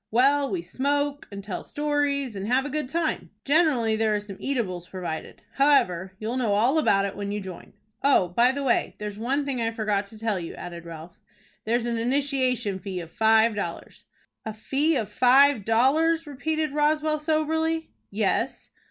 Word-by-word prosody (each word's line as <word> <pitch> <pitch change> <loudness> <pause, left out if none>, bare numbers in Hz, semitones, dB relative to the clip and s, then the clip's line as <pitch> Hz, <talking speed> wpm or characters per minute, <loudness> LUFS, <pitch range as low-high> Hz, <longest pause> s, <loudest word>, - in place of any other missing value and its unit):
"Well, 275 +4 +3
we 355 -3 -3
smoke, 285 +1 -1
and 200 0 -7
tell 195 -2 -5
stories, 290 -4 -1
and 195 +1 -4
have 255 +3 +2
a 290 - -5
good 300 -3 -3
time. 330 0 -2 0.2
Generally 275 -8 +3
there 220 -1 +1
are - - 0
some 205 -2 -9
eatables 185 -10 -3
provided. 175 -4 -6
However, 190 -10 +2
you'll 225 +5 -3
know 230 -5 +1
all 250 +9 +3
about 195 -9 +3
it, 200 - -4
when 200 0 -4
you 205 - -2
join. 190 -3 -9 0.3
Oh, 270 -10 +3
by 235 +8 +3
the 280 +1 -4
way, 255 - +1
there's 210 0 -6
one 275 +5 0
thing 265 -4 -2
I 225 - +1
forgot 210 -3 -1
to 220 - -13
tell 215 -3 -1
you," 170 - -7
added 170 -1 -8
Ralph. 165 +1 -10 0.5
"There's 235 +2 0
an 235 -1 -1
initiation 255 -5 0
fee 190 -2 -5
of 165 -1 -9
five 220 +2 +4
dollars." 200 -5 -6 0.4
"A 220 -1 -6
fee 285 +8 0
of 225 -6 -1
five 255 +3 +4
dollars!" 310 +9 +3
repeated 310 +2 -2
Roswell, 305 +1 +1
soberly. 320 +1 0 0.2
"Yes." - - -1
245 Hz, 180 wpm, -25 LUFS, 205-285 Hz, 0.5 s, five